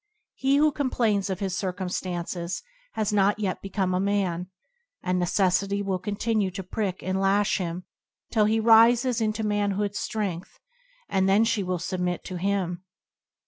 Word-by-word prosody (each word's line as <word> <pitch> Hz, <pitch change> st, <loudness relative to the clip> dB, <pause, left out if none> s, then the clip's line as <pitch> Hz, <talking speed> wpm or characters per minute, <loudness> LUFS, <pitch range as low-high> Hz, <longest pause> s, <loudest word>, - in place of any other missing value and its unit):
He 270 Hz, +1 st, +1 dB
who 300 Hz, +1 st, +4 dB
complains 230 Hz, -8 st, 0 dB
of 190 Hz, 0 st, -3 dB
his 190 Hz, -2 st, -1 dB
circumstances 180 Hz, -, -3 dB, 0.3 s
has 215 Hz, -1 st, -1 dB
not 205 Hz, 0 st, +3 dB
yet 200 Hz, -3 st, -2 dB
become 195 Hz, -1 st, -1 dB
a 180 Hz, -, +1 dB
man, 190 Hz, -3 st, 0 dB, 0.6 s
and 180 Hz, 0 st, 0 dB
Necessity 195 Hz, +2 st, +1 dB
will 190 Hz, -2 st, -1 dB
continue 205 Hz, +1 st, -1 dB
to 190 Hz, +1 st, -6 dB
prick 190 Hz, 0 st, -3 dB
and 190 Hz, +1 st, -1 dB
lash 200 Hz, +2 st, +2 dB
him 175 Hz, 0 st, -4 dB, 0.5 s
till 215 Hz, -3 st, +3 dB
he 220 Hz, +1 st, +2 dB
rises 235 Hz, +2 st, +5 dB
into 215 Hz, 0 st, 0 dB
man 205 Hz, -1 st, +1 dB
hood's 205 Hz, +1 st, -2 dB
strength, 195 Hz, -6 st, -4 dB, 0.5 s
and 190 Hz, 0 st, +1 dB
then 200 Hz, +3 st, +5 dB
she 230 Hz, -2 st, +1 dB
will 185 Hz, -1 st, -1 dB
submit 180 Hz, 0 st, -2 dB
to 185 Hz, -, -6 dB
him. 185 Hz, -1 st, -1 dB
195 Hz, 155 wpm, -26 LUFS, 185-215 Hz, 0.6 s, rises